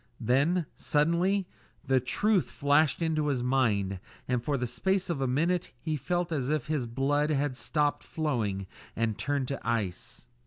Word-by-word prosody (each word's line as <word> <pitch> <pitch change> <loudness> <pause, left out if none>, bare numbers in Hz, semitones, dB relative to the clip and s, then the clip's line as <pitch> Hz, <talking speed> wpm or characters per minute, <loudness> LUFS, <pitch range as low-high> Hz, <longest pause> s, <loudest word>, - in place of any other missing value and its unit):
Then, 155 +8 +2
suddenly, 170 +6 +2 0.4
the 130 -1 +3
truth 195 - +1
flashed 145 +2 +2
into 155 -2 +1
his 130 -4 0
mind, 105 -7 +1 0.3
and 125 -2 0
for 145 0 0
the 125 - -1
space 180 +11 0
of 145 -5 -2
a 135 - +1
minute 170 +7 0
he 155 +4 -2
felt 175 +5 -1
as 140 -4 -1
if 155 -1 0
his 150 -6 -1
blood 140 +5 +1
had 145 -2 0
stopped 145 +2 0
flowing 115 -11 -2 0.3
and 115 -1 0
turned 140 +2 -1
to 140 - -3
ice. 110 -6 -3
145 Hz, 160 wpm, -29 LUFS, 125-160 Hz, 0.4 s, the